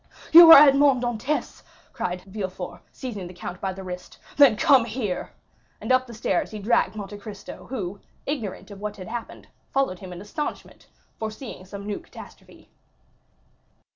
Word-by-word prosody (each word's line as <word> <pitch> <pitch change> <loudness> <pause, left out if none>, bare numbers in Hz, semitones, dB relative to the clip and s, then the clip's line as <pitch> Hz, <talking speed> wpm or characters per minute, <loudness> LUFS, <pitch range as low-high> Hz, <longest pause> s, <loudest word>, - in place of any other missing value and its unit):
"You 330 0 +11
are - - +13
Edmond 275 -2 +4
Dantès," 240 +5 -2 0.3
cried 180 0 -4
Villefort, 190 -2 -6
seizing 210 -8 -6
the 180 - -12
count 180 0 -7
by 195 - -1
the 190 +1 -8
wrist; 180 -1 -8 0.2
"then 280 -6 +7
come 265 +2 +5
here!" 215 -5 -4 0.5
And - - -3
up 255 0 +3
the 235 - -10
stairs 195 -4 -1
he 215 - -7
dragged 210 -1 +1
Monte 205 -1 -7
Cristo; 205 -1 -10
who, 200 -6 -5 0.3
ignorant 230 -8 -5
of 200 0 -11
what 210 0 -5
had 185 - -9
happened, 235 0 -7 0.2
followed 270 -10 0
him 185 -2 -9
in 175 - -8
astonishment, 210 +10 -6 0.3
foreseeing 220 -2 -7
some 200 +1 -9
new 205 -1 -3
catastrophe. - - -15
210 Hz, 160 wpm, -24 LUFS, 190-255 Hz, 0.5 s, are